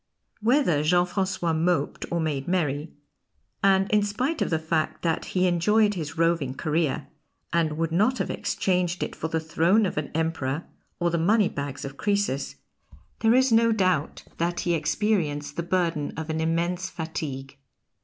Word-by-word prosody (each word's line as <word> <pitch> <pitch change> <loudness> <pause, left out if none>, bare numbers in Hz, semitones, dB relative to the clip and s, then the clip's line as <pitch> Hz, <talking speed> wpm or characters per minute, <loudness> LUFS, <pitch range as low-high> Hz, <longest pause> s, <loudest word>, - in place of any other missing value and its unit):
Whether 225 - +3
Jean 175 +3 +3
Francois 185 -2 -1
moped 170 +2 0
or 170 - 0
made 150 -4 -2
merry, 155 -4 -1 0.7
and 195 0 +4
in 210 0 +4
spite 250 +10 -1
of - - +1
the 160 - +1
fact 160 0 -2
that 165 -2 0
he 185 0 0
enjoyed 210 +5 +3
his 160 -3 -5
roving 165 -6 +1
career 155 0 -1 0.5
and 160 -3 +1
would 165 0 -1
not 215 +10 +2
have 195 - -2
exchanged 180 -2 0
it - - -5
for - - -3
the 160 0 -1
throne 170 +6 +2
of 180 - -1
an 150 - -5
Emperor 160 -2 -1 0.4
or 175 -1 +1
the 170 - 0
money 205 +4 +3
bags 140 -1 -5
of 140 0 -8
Croesus, 200 -10 -1 0.6
there 225 +1 +4
is 260 0 +4
no 230 0 +5
doubt 185 -8 0 0.2
that 175 +1 0
he 175 - 0
experienced 150 -3 0
the - - -1
burden 170 -4 -1
of 160 0 -3
an 160 0 -1
immense 175 +3 0
fatigue. 140 -5 -6
170 Hz, 165 wpm, -26 LUFS, 155-190 Hz, 0.7 s, no